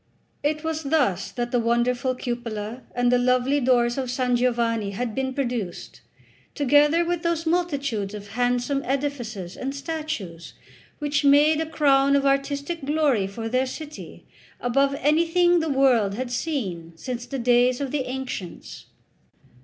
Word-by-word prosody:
It 305 +2 -1
was 320 -1 -2
thus 275 - +1
that 240 -1 -4
the 245 - +2
wonderful 245 +2 +1
cupola 235 -2 -5
and 245 0 +2
the 250 - +4
lovely 255 +3 +2
doors 240 -1 +2
of 260 -2 -3
San 250 0 +1
Giovanni 235 -3 +1
had 235 +2 -3
been 265 +1 -2
produced, 240 -9 -4 0.5
together 295 +4 +4
with 345 -1 -1
those 335 -1 -1
multitudes 280 - -1
of 205 -1 -9
handsome 245 +4 0
edifices 245 -9 -3
and 270 +2 -4
statues 280 - -5 0.4
which 290 -1 -1
made 295 +2 +5
a 320 - -2
crown 280 -3 +3
of 280 0 +2
artistic 280 +3 0
glory 280 -8 +1
for 225 +3 -6
their 255 +3 +1
city 300 +3 -9 0.3
above 275 +3 +1
anything 335 +4 +3
the 320 -1 -1
world 250 -8 +3
had 250 +1 -4
seen 200 - -3
since 245 +6 -6
the 275 - -4
days 245 0 +3
of 275 -2 -3
the 280 -3 -1
ancients. 255 -9 -6
260 Hz, 145 wpm, -24 LUFS, 240-290 Hz, 0.5 s, made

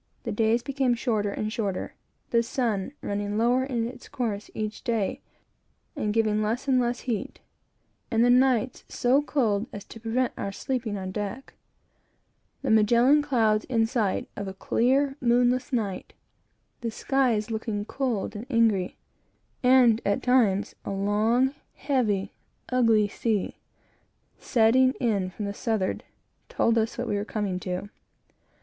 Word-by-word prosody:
The 230 - -3
days 225 +2 +1
became 265 -2 +1
shorter 220 -4 0
and 215 +2 -3
shorter; 200 -5 -3 0.4
the 235 - +4
sun 230 -3 -1
running 205 +1 -2
lower 245 +3 +3
in 240 -4 -1
its 250 +1 -11
course 215 -5 -3
each 215 0 -4
day, 230 -6 -1 0.7
and 210 - -1
giving 215 -1 +1
less 230 +6 -2
and 260 -2 +4
less 245 0 -1
heat; 230 -6 -4 0.7
and 230 +1 +3
the 245 - +5
nights 255 -1 +2
so 255 +4 +2
cold 230 -8 0
as 205 - -8
to 225 - -11
prevent 235 +3 -1
our 200 - -4
sleeping 230 -1 -3
on 185 -1 -5
deck; 210 +6 -5 1.1
the 265 - 0
Magellan 235 +7 +5
Clouds 225 -7 +2
in 225 -3 +2
sight, 225 -4 -1
of 200 - -5
a 190 - -6
clear 270 +8 +1
night; 245 -3 +1 0.7
the 235 - -3
skies 235 -2 0
looking 220 -2 -3
cold 240 -6 -2
and 220 +5 -7
angry; 225 -7 +2 0.6
and, 250 -3 +5
at 200 0 0
times, 225 -6 +2
a - - -6
long, 215 +7 +1 0.2
heavy, 220 -9 0 0.4
ugly 230 -4 +3
sea, 215 -1 -2 0.8
setting 255 +2 +4
in 205 -8 0
from 205 +3 -6
the 200 - -3
southwards 210 -3 -1 0.5
told 230 - +2
us 225 +1 -2
what 245 0 -3
we 205 - 0
were 200 - -1
coming 205 -3 -3
to. 185 +2 -5
225 Hz, 145 wpm, -26 LUFS, 205-250 Hz, 1.1 s, the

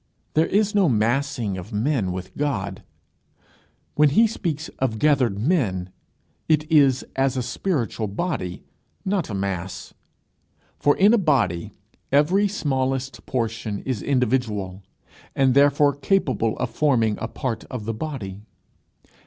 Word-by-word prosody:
There 160 +1 +3
is 210 +1 +1
no 200 -5 +4
massing 120 -2 0
of 95 +6 -10
men 110 -3 0
with 90 0 -7
God. 100 -10 -2 1.1
When 150 0 +4
he 220 +12 +5
speaks 165 -8 -3
of 125 -4 0
gathered 130 -6 +2
men, 100 - 0 0.6
it 155 -1 +4
is 140 -4 +4
as 135 -1 +1
a 125 - 0
spiritual 120 - -2
body, 100 - -3 0.4
not 190 -6 0
a 105 - -3
mass. 95 -2 -4 0.9
For 145 - +3
in 205 +4 +6
a 235 - +5
body 120 - +1 0.4
every 170 +9 +4
smallest 135 -8 -2
portion 115 -4 -2
is 130 -6 -2
individual, 110 -8 0 0.5
and 135 -2 +3
therefore 145 +1 +4
capable 135 - 0
of 125 - -2
forming 115 -8 +2
a 115 - -1
part 115 0 -4
of 125 -5 -6
the 115 - -2
body. 110 -7 -5
130 Hz, 130 wpm, -23 LUFS, 105-150 Hz, 1.1 s, in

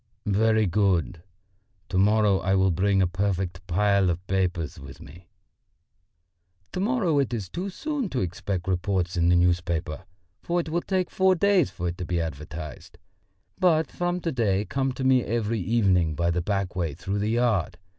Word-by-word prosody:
"Very 110 +2 +3
good; 90 - +1 0.7
to 95 - -1
morrow 105 -1 +3
I 95 +1 +1
will 95 -1 +3
bring 95 +3 +2
a - - +2
perfect 95 -1 -2
pile 100 +1 +2
of 90 +2 -3
papers 90 -4 -1
with 70 0 -11
me." 85 +4 -14 1.4
"To - - -4
morrow 195 - +1
it 125 -3 0
is 105 -5 -4
too 185 - -4
soon 285 +2 -3
to 130 - -2
expect 90 +1 -3
reports 90 0 -1
in 85 0 +2
the 90 - +5
newspapers, 85 -3 0 0.4
for 175 +1 -1
it 165 - -3
will 170 +2 0
take 185 -1 -1
four 190 0 +3
days 190 -3 +3
for 90 - -4
it 85 - -7
to 90 - -3
be 85 0 -1
advertised. 80 0 -7 0.6
But 160 -4 +3
from 175 0 -1
to 165 - -1
day 105 -6 0
come 135 +2 -1
to 130 - -5
me 130 -1 +4
every 115 -1 -1
evening 90 -6 +2
by 85 +3 +1
the 90 +1 0
back 100 0 -2
way 85 -6 -2
through 100 +5 -3
the 105 +1 -1
yard. 110 -7 +1
95 Hz, 175 wpm, -25 LUFS, 90-125 Hz, 1.4 s, the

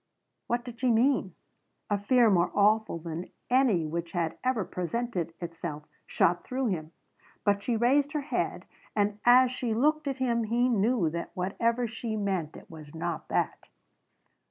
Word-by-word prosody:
What 240 +1 -1
did 245 -1 -9
she 255 - +2
mean? 235 -5 +2 0.6
A 205 - +2
fear 235 +2 +4
more 175 -2 +3
awful 210 -1 +3
than 165 +1 -6 0.2
any 245 -11 +3
which 170 +2 -4
had 165 -3 -1
ever 255 -6 +1
presented 180 -1 -3
itself 165 -3 -6 0.2
shot 175 +1 +2
through 255 -1 -1
him. 160 -4 -3 0.5
But 200 -1 +2
she 235 +2 0
raised 280 +6 +2
her 300 - 0
head 280 - -2 0.3
and 205 0 +1
as 250 +1 +7
she 245 -3 -2
looked 300 +5 +2
at 270 -1 -2
him 235 -3 0
he 240 +3 +2
knew 215 -6 +2
that 170 +1 -4
whatever 230 +6 0
she 220 0 -4
meant 190 -7 -2
it - - -14
was 155 -2 -12
not 165 0 -4
that. - - -1
215 Hz, 160 wpm, -28 LUFS, 175-245 Hz, 0.6 s, as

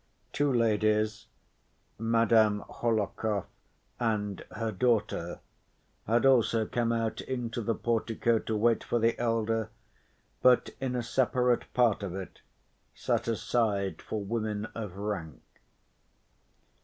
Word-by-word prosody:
Two 145 -1 +2
ladies, 110 -2 +1 0.7
Madame 115 -2 +3
Hohlakov 105 -3 -1 0.5
and 105 -4 -1
her 110 +1 -3
daughter, 105 -6 0 0.7
had 115 +3 +3
also 115 -4 +4
come 115 +1 0
out 115 -1 -1
into 120 -2 -3
the 115 +1 -1
portico 115 0 0
to 110 - -3
wait 115 +1 +2
for 120 - 0
the 115 0 +2
elder, 115 -1 0 0.7
but 125 -1 +4
in 130 -1 -2
a 120 - -1
separate 125 0 +1
part 120 -5 +3
of 95 -3 -4
it 95 -1 -8 0.5
set - - -1
aside 110 -3 0
for 110 -2 -4
women 105 0 -2
of 105 -5 -6
rank. 95 -9 -4
115 Hz, 115 wpm, -29 LUFS, 105-120 Hz, 0.7 s, also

